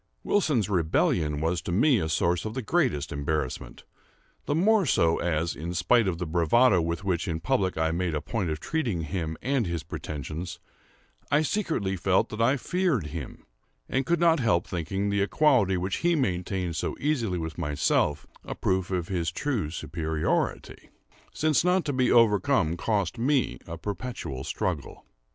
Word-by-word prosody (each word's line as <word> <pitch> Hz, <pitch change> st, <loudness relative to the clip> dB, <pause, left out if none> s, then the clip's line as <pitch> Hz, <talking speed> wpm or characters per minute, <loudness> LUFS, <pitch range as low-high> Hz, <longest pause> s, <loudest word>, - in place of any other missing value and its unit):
Wilson's 150 Hz, -, +1 dB
rebellion 80 Hz, -4 st, +1 dB
was 85 Hz, +2 st, 0 dB
to -, -, -5 dB
me 120 Hz, -, +4 dB
a 80 Hz, -, -2 dB
source 85 Hz, +2 st, +1 dB
of 110 Hz, +1 st, -5 dB
the 130 Hz, -, -3 dB
greatest 120 Hz, -, 0 dB
embarrassment; 70 Hz, -4 st, -3 dB, 0.6 s
the 145 Hz, -, +1 dB
more 205 Hz, +5 st, +4 dB
so 85 Hz, -, +2 dB
as, 85 Hz, -1 st, -1 dB
in 85 Hz, +5 st, -5 dB
spite 105 Hz, +5 st, +3 dB
of 90 Hz, -3 st, -1 dB
the 90 Hz, -, -3 dB
bravado 90 Hz, +6 st, +3 dB
with 85 Hz, +3 st, -2 dB
which 95 Hz, -1 st, -1 dB
in 80 Hz, -3 st, -2 dB
public 95 Hz, -4 st, 0 dB
I 80 Hz, 0 st, +1 dB
made 85 Hz, -1 st, -1 dB
a -, -, 0 dB
point 100 Hz, 0 st, -3 dB
of 75 Hz, -1 st, -3 dB
treating 120 Hz, -, -1 dB
him 80 Hz, -1 st, -3 dB
and 130 Hz, -5 st, +1 dB
his 85 Hz, -2 st, -3 dB
pretensions, 80 Hz, +2 st, -6 dB, 0.7 s
I 145 Hz, +3 st, +3 dB
secretly 155 Hz, -, -1 dB
felt 95 Hz, +1 st, +2 dB
that 110 Hz, +1 st, -4 dB
I 130 Hz, +5 st, +3 dB
feared 175 Hz, -, 0 dB
him, 80 Hz, -7 st, -7 dB, 0.4 s
and 135 Hz, -, 0 dB
could 170 Hz, +3 st, +1 dB
not 165 Hz, -2 st, +4 dB
help 110 Hz, -9 st, +2 dB
thinking 95 Hz, +4 st, -2 dB
the 100 Hz, 0 st, +1 dB
equality 105 Hz, -4 st, +3 dB
which 95 Hz, +2 st, -2 dB
he 175 Hz, 0 st, +2 dB
maintained 90 Hz, -, -1 dB
so -, -, -2 dB
easily 120 Hz, -11 st, 0 dB
with 80 Hz, -2 st, -5 dB
myself, 75 Hz, 0 st, +1 dB, 0.2 s
a -, -, -6 dB
proof 95 Hz, -1 st, 0 dB
of 90 Hz, -3 st, -2 dB
his 85 Hz, -4 st, -1 dB
true 120 Hz, -, -2 dB
superiority; 80 Hz, 0 st, -2 dB, 0.4 s
since 155 Hz, -1 st, +2 dB
not 180 Hz, 0 st, +2 dB
to 145 Hz, -, -1 dB
be 130 Hz, -1 st, +2 dB
overcome 115 Hz, -, +3 dB
cost 105 Hz, +2 st, -1 dB
me 135 Hz, +2 st, +1 dB
a 85 Hz, 0 st, -6 dB
perpetual 100 Hz, -, -5 dB
struggle. -, -, -3 dB
95 Hz, 170 wpm, -27 LUFS, 80-130 Hz, 0.7 s, me